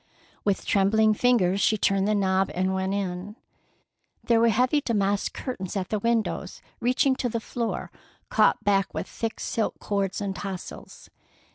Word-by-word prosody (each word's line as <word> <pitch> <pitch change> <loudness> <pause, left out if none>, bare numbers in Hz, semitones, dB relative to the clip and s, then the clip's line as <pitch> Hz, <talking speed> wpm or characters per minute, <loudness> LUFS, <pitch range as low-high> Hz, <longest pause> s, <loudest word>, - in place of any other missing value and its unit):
With 200 -2 0
trembling 215 +2 +3
fingers 205 -5 +2
she 215 - +3
turned 195 -1 +2
the 215 - +2
knob 190 -1 +2
and 185 +1 0
went 190 0 -1
in. 195 +1 -4 0.9
There 230 -1 +3
were 230 0 +5
heavy 250 +6 +2
damask 205 -5 0
curtains 195 -7 -5
at 185 -1 -3
the 215 - 0
windows, 230 0 -1 0.2
reaching 255 +2 +2
to 245 - -1
the 230 - -2
floor, 230 0 -4 0.4
caught - - +3
back 195 -1 +1
with - - -3
thick 225 -1 -4
silk 225 - -2
cords 200 -2 -2
and 200 -2 -3
tassels. 190 -2 -8
205 Hz, 155 wpm, -26 LUFS, 195-230 Hz, 0.9 s, were